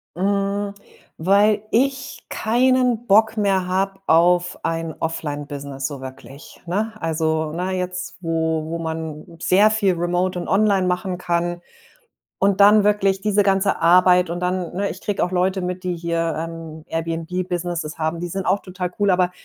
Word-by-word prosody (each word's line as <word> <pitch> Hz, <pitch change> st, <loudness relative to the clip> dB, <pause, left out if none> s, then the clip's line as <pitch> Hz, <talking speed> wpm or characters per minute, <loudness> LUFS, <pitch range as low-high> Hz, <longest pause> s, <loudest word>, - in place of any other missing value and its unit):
Hm, 200 Hz, +2 st, -1 dB, 0.4 s
weil 205 Hz, +4 st, +3 dB
ich 270 Hz, +3 st, 0 dB
keinen 245 Hz, 0 st, +1 dB
Bock 220 Hz, +3 st, +4 dB
mehr 195 Hz, -3 st, +1 dB
habe 195 Hz, +1 st, -1 dB
auf 175 Hz, +2 st, +3 dB
ein 165 Hz, -1 st, -2 dB
Offline-Business 145 Hz, -4 st, -4 dB
so 140 Hz, -2 st, -8 dB
wirklich, 130 Hz, +2 st, -11 dB
ne? 215 Hz, +5 st, -1 dB
Also 160 Hz, -1 st, -1 dB
na, 180 Hz, +2 st, -2 dB
jetzt, 180 Hz, 0 st, -4 dB
wo 160 Hz, -1 st, -1 dB
wo 170 Hz, -, -3 dB
man 160 Hz, -2 st, -5 dB, 0.2 s
sehr 205 Hz, +4 st, +4 dB
viel 200 Hz, -4 st, +2 dB
remote 180 Hz, +1 st, -1 dB
und 175 Hz, -, -5 dB
online 200 Hz, -2 st, +3 dB
machen 180 Hz, 0 st, -1 dB
kann 175 Hz, 0 st, -1 dB, 0.8 s
und 200 Hz, 0 st, +2 dB
dann 205 Hz, +1 st, +7 dB
wirklich 200 Hz, -2 st, +2 dB
diese 205 Hz, 0 st, +2 dB
ganze 195 Hz, 0 st, +2 dB
Arbeit 180 Hz, +1 st, +5 dB
und 175 Hz, +1 st, -4 dB
dann 180 Hz, -1 st, -2 dB
ne, 200 Hz, +2 st, -1 dB
ich 180 Hz, +4 st, -8 dB
kriege 205 Hz, -, -2 dB
auch 180 Hz, -, -3 dB
Leute 185 Hz, +1 st, +1 dB
mit, 180 Hz, +1 st, -4 dB
die 180 Hz, -1 st, -1 dB
hier, 165 Hz, -1 st, -1 dB
ähm, 160 Hz, -1 st, -7 dB
Airbnb-Businesses 165 Hz, 0 st, -3 dB
haben, 160 Hz, +1 st, -1 dB
die 175 Hz, -, -4 dB
sind 190 Hz, +2 st, -4 dB
auch 195 Hz, +2 st, +3 dB
total 180 Hz, -1 st, -5 dB
cool, 205 Hz, -1 st, +3 dB
aber 180 Hz, 0 st, +2 dB
180 Hz, 155 wpm, -21 LUFS, 165-195 Hz, 0.8 s, dann